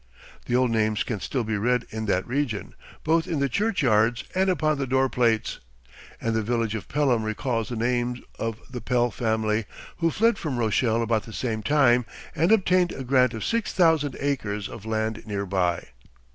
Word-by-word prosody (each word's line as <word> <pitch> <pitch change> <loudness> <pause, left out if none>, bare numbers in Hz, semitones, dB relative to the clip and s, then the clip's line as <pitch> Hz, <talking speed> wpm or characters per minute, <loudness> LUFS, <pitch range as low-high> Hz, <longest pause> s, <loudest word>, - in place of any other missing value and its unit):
The 120 - +1
old 125 -1 +3
names 110 -1 +1
can 115 -5 -3
still 130 +3 -2
be 110 -1 -2
read 125 +3 +1
in 110 0 -4
that 95 -2 +1
region, 125 -5 -2 0.3
both 160 +1 +2
in 160 - -1
the 140 - +2
churchyards 120 - +2
and 190 +1 +2
upon 155 -4 +1
the 135 - -1
door 130 +1 +2
plates, 115 -4 +1 0.6
and 115 - -1
the 110 - +1
village 115 0 -1
of 110 - -5
Pelham 135 -5 +1
recalls 110 +1 -2
the 120 - -4
name 120 +1 -1 0.2
of 115 -1 -3
the 125 - -7
Pell 120 -1 +1
family 110 -1 0 0.3
who 165 -1 +2
fled 230 +7 +2
from 145 -6 -3
Rochelle 115 0 +1
about 115 -1 +1
the 115 - -10
same 110 -2 -2
time, 125 -3 +3 0.3
and 165 +6 +2
obtained 185 -4 +3
a 135 - -6
grant 125 -2 +3
of 110 - -4
six 230 -1 -1
thousand 160 -6 +3
acres 105 -8 -2
of 110 -2 -10
land 110 0 -1
near 100 -1 -2
by. 90 -3 -1
120 Hz, 185 wpm, -25 LUFS, 110-140 Hz, 0.6 s, old